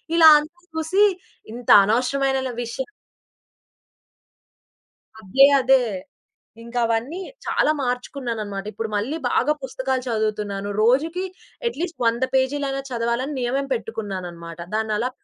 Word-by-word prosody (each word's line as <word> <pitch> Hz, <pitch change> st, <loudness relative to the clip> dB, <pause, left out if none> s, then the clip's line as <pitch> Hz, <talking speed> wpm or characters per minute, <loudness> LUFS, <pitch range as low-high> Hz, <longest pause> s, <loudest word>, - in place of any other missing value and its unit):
ఇలా 330 Hz, -1 st, +8 dB
అంతా 325 Hz, +4 st, -10 dB
చూసి 320 Hz, +6 st, +2 dB, 0.5 s
ఇంత 245 Hz, 0 st, -8 dB
అనవసరమైనన 265 Hz, +4 st, +1 dB
విష 235 Hz, -1 st, -5 dB, 2.5 s
అదే 265 Hz, +8 st, +6 dB, 0.2 s
అదే. 260 Hz, 0 st, +4 dB, 0.8 s
ఇంకా 235 Hz, +1 st, -5 dB
అవన్నీ 230 Hz, +9 st, -1 dB, 0.3 s
చాలా 305 Hz, -, +2 dB
మార్చుకున్నానన్నమాట. 240 Hz, -6 st, -3 dB
ఇప్పుడు 225 Hz, 0 st, -4 dB
మళ్ళీ 220 Hz, +10 st, -1 dB
బాగా 280 Hz, +4 st, +2 dB
పుస్తకాలు 260 Hz, 0 st, -2 dB
చదువుతున్నాను. 210 Hz, -3 st, -2 dB
రోజుకి 315 Hz, +10 st, +2 dB, 0.4 s
అట్‌లీస్ట్ 345 Hz, -4 st, -5 dB
100 235 Hz, +2 st, +2 dB
పేజీలన్నా, 270 Hz, +1 st, 0 dB
చదవాలని 235 Hz, +4 st, -1 dB
నియమం 265 Hz, +3 st, -1 dB
పెట్టుకున్నానన్నమాట. 185 Hz, -8 st, -5 dB, 0.2 s
దాన్నలా 220 Hz, +2 st, 0 dB
245 Hz, 100 wpm, -23 LUFS, 220-275 Hz, 2.5 s, ఇలా